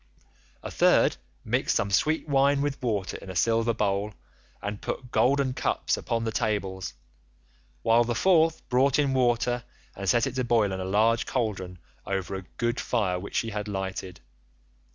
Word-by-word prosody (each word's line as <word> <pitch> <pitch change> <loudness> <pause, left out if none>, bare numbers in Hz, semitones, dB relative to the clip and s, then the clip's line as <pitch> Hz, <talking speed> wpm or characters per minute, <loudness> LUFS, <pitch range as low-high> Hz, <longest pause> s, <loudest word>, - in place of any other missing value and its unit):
A - - -6
third - - +4 0.3
mixed - - +1
some 100 - 0
sweet 155 +10 +1
wine 140 0 +3
with 145 -1 -3
water 105 -6 -2
in 95 - -11
a 95 - -6
silver 115 +6 +2
bowl 105 -1 -1 0.4
and 105 0 -5
put 125 -2 -5
golden 135 0 +2
cups - - 0
upon 115 0 -2
the 115 - -1
tables, 100 -5 -2 0.9
while 115 +1 +5
the 120 0 -2
fourth 165 -2 +3
brought 130 +2 +3
in 140 -2 +2
water 120 -1 +1 0.3
and 95 0 -3
set 120 -1 +3
it - - -3
to 130 -1 -1
boil 115 -4 +2
in 95 - -3
a 95 - -3
large 110 +4 +2
cauldron 95 -7 -2 0.3
over 95 -1 -3
a 95 - -3 0.2
good 120 +1 0
fire 95 -7 0
which 100 - -8
she 115 - 0
had 105 0 -4
lighted. 95 -4 -5
115 Hz, 170 wpm, -27 LUFS, 100-125 Hz, 0.9 s, while